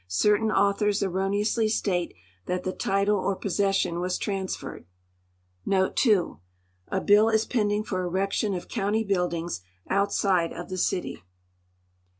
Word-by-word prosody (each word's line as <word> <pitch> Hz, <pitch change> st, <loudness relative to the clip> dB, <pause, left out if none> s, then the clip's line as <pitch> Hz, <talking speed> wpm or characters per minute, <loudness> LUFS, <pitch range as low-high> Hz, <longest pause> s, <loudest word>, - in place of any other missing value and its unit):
Certain 210 Hz, -, +2 dB
autliors 205 Hz, 0 st, +2 dB
erroneously 200 Hz, +4 st, 0 dB
state 180 Hz, -5 st, -1 dB, 0.3 s
tliat 180 Hz, 0 st, -2 dB
tile 185 Hz, -, -2 dB
title 200 Hz, +1 st, +1 dB
or 195 Hz, +1 st, 0 dB
possession 195 Hz, -3 st, 0 dB
was 180 Hz, +1 st, -1 dB
transferreil. 195 Hz, -, -4 dB, 0.7 s
t 190 Hz, -, +2 dB, 0.8 s
A 190 Hz, -, +1 dB
l)ill 210 Hz, +3 st, +5 dB
is 220 Hz, 0 st, +2 dB
iienilin^ 210 Hz, -2 st, 0 dB
for 185 Hz, -3 st, -2 dB
erection 195 Hz, +3 st, -1 dB
of 175 Hz, -, -6 dB
county 220 Hz, 0 st, -1 dB
liuililiuKs 175 Hz, -, -1 dB, 0.3 s
outside 195 Hz, -3 st, +1 dB
of -, -, -7 dB
tlio 185 Hz, 0 st, -4 dB
city. 175 Hz, -, -1 dB
195 Hz, 125 wpm, -26 LUFS, 185-210 Hz, 0.8 s, l)ill